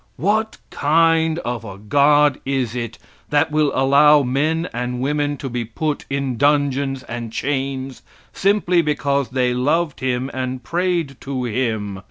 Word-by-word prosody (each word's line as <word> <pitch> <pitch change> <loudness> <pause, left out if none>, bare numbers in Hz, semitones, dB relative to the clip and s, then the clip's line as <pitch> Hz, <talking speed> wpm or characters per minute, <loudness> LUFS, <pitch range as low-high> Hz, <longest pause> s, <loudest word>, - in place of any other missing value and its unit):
What 220 +5 0
kind 160 +1 +2
of 120 -1 -3
a 100 -4 -8
God 145 +6 +3
is 130 -4 -2
it 115 -2 -4 0.3
that 150 +1 +2
will 150 -2 +2
allow 140 +2 +5
men 155 +6 0
and 125 +1 -3
women 145 +2 -1
to 135 - -5
be 120 -2 -3
put 145 +7 -3
in 135 -3 -2
dungeons 140 -1 +1
and 115 -1 -6
chains 135 +1 -3 0.3
simply 195 -3 +2
because 140 -3 0
they 125 -2 +1
loved 150 +5 0
Him 130 0 -2
and 130 -1 -4
prayed 170 -3 -1
to 135 -2 -4
Him? 110 -5 -2
140 Hz, 145 wpm, -20 LUFS, 125-150 Hz, 0.3 s, allow